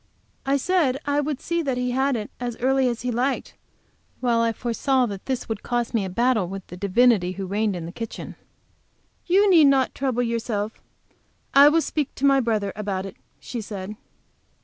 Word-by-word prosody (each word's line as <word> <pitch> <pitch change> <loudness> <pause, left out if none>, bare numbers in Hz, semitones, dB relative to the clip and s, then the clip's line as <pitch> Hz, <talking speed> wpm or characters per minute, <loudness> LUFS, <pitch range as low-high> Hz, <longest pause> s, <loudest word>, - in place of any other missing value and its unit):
I 275 +1 +3
said 280 -4 +1
I 285 0 +1
would 290 -2 -3
see 340 0 -1
that 270 -5 -1
he 250 0 -1
had 265 +1 +1
it 215 -2 -5
as 240 -2 -4
early 265 +1 +2
as 240 -1 -3
he 250 - -1
liked, 255 +3 -1 0.7
while 240 -2 +1
I 230 0 +2
foresaw 250 +3 0
that 200 -4 -7
this 260 -2 -2
would 220 -2 -4
cost 240 -1 -2
me 225 -4 +1
a 190 - -4
battle 230 -1 +1
with 195 0 -7
the - - -10
divinity 200 0 +3
who 195 0 -5
reigned 205 +1 0
in 170 -2 -5
the 170 - -7
kitchen. 225 +4 -7 0.9
"You 390 +3 +4
need 335 -6 +7
not 270 -2 +3
trouble 255 -3 -1
yourself. 225 -2 -3 0.7
I 280 +1 +8
will 325 +2 +3
speak 300 -3 -3
to 275 - -1
my 275 -1 +5
brother 215 -5 -1
about 195 -2 -3
it," 195 - -8 0.2
she 240 - -6
said. 205 -1 -6
240 Hz, 195 wpm, -24 LUFS, 210-270 Hz, 0.9 s, I